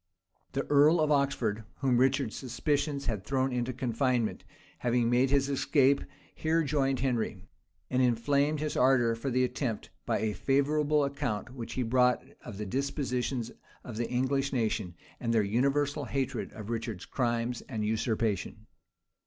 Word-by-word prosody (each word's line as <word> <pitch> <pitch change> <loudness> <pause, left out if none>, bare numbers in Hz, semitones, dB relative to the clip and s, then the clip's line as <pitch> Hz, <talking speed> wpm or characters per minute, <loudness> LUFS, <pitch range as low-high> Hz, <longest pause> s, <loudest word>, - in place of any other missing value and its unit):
The - - -1
earl 150 +4 +5
of 155 -1 +2
Oxford, 125 -7 +1
whom 130 -3 +2
Richard's 130 -2 +2
suspicions 140 +3 -1
had 105 -6 -2
thrown 135 -1 0
into 125 0 -1
confinement, 125 -1 0 0.4
having 120 -1 +1
made 125 +2 +3
his 140 0 +3
escape, 140 0 +3 0.3
here 160 +1 +1
joined 135 -3 0
Henry; 115 -7 -1 0.4
and 130 0 +1
inflamed 140 +5 +2
his 155 -1 -2
ardor 125 -3 +4
for 115 +4 -3
the 130 0 +2
attempt, 125 -3 -2 0.2
by - - +2
a 110 0 -1
favorable 145 +4 +2
account 125 -5 -3
which 120 -3 -6
he 130 - -1
brought 125 +1 +3 0.2
of 105 -5 -8
the 105 - -4
dispositions 130 0 -2 0.3
of 115 -3 -7
the 120 - -2
English 135 +2 0
nation, 110 -7 -1 0.2
and 115 - -1
their 110 - +4
universal 140 +7 +1
hatred 135 0 -2
of 110 +1 -7
Richard's 115 -5 -4
crimes 120 -1 -1
and 110 -5 -2
usurpation. 110 -1 -1
125 Hz, 150 wpm, -30 LUFS, 115-140 Hz, 0.4 s, earl